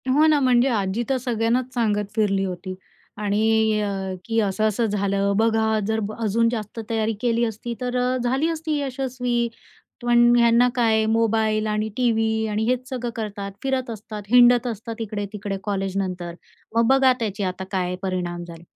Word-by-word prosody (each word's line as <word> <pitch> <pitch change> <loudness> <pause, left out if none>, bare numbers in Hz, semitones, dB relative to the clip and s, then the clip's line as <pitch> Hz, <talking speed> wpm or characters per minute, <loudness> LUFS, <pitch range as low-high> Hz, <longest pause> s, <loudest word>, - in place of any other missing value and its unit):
हो 305 +2 +5
ना, 305 -2 +4
म्हणजे 255 -1 +3
आजी 205 -1 0
तर 270 - +2
सगळ्यांनाच 245 +1 -1
सांगत 210 -4 0
फिरली 195 -3 +1
होती. 185 0 -5 0.4
आणि 215 +1 +2
अ 195 -2 -3
की 225 0 0
"असं-असं 215 +2 +1
झालं. 200 -1 0
बघा 220 -1 +2
जर 220 0 0 0.2
अजून 230 +1 +2
जास्त 220 -1 -5
तयारी 225 -1 0
केली 235 -1 +1
असती, 230 +2 -4
तर 250 0 -2
अ, 250 +1 +1
झाली 265 +6 +1
असती 315 -2 -2
यशस्वी. 250 -3 -1 0.6
पण 240 0 +5
ह्यांना 235 +1 +5
काय 225 -3 +2
मोबाईल 220 -1 +1
आणि 215 0 -1
टीव्ही 225 -2 +1
आणि 215 +1 -1
हेच 255 +2 -1
सगळं 245 -3 -3
करतात, 205 -3 -5
फिरत 265 -2 -1
असतात, 215 -1 -7
हिंडत 245 +1 +6
असतात 230 0 -5
इकडे-तिकडे 205 -2 -4
कॉलेजनंतर. 190 -3 -3 0.4
मग 230 0 +4
बघा 265 -1 +5
त्याचे 205 -2 -2
आता 185 0 -3
काय 180 -1 -1
परिणाम 175 -2 -3
झाले." 165 0 -10
220 Hz, 155 wpm, -23 LUFS, 205-240 Hz, 0.6 s, हिंडत